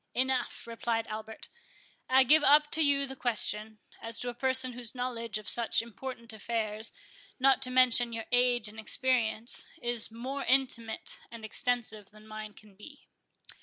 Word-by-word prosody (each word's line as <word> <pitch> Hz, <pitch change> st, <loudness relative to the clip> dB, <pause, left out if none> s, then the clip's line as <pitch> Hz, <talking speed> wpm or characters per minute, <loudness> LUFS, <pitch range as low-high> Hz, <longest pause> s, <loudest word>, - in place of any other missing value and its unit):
"Enough," 260 Hz, 0 st, -1 dB
replied 230 Hz, -1 st, -2 dB
Albert; 220 Hz, 0 st, -8 dB, 0.6 s
"I 260 Hz, +1 st, +6 dB
give 300 Hz, +4 st, +5 dB
up 295 Hz, +1 st, +5 dB
to 320 Hz, -, +3 dB
you 280 Hz, -1 st, +2 dB
the 265 Hz, 0 st, -8 dB
question, 220 Hz, -3 st, 0 dB, 0.2 s
as 230 Hz, 0 st, -2 dB
to 245 Hz, -, -4 dB
a -, -, -5 dB
person 260 Hz, 0 st, +2 dB
whose 240 Hz, 0 st, -5 dB
knowledge 235 Hz, -3 st, -3 dB
of 215 Hz, -, -10 dB
such 235 Hz, -1 st, +4 dB
important 235 Hz, +1 st, -7 dB
affairs, 220 Hz, 0 st, -3 dB, 0.5 s
not 270 Hz, 0 st, +4 dB
to 255 Hz, -, 0 dB
mention 250 Hz, -2 st, +3 dB
your 230 Hz, -1 st, -5 dB
age 245 Hz, -2 st, +3 dB
and 215 Hz, +1 st, -7 dB
experience, 235 Hz, 0 st, +1 dB
is 240 Hz, -1 st, +1 dB
more 260 Hz, +5 st, -5 dB
intimate 245 Hz, -3 st, 0 dB
and 230 Hz, -2 st, -9 dB
extensive 220 Hz, -2 st, -2 dB
than 215 Hz, +1 st, -18 dB
mine 215 Hz, -1 st, -8 dB
can 210 Hz, -1 st, -18 dB
be." 280 Hz, +9 st, -15 dB
235 Hz, 160 wpm, -30 LUFS, 220-255 Hz, 0.6 s, I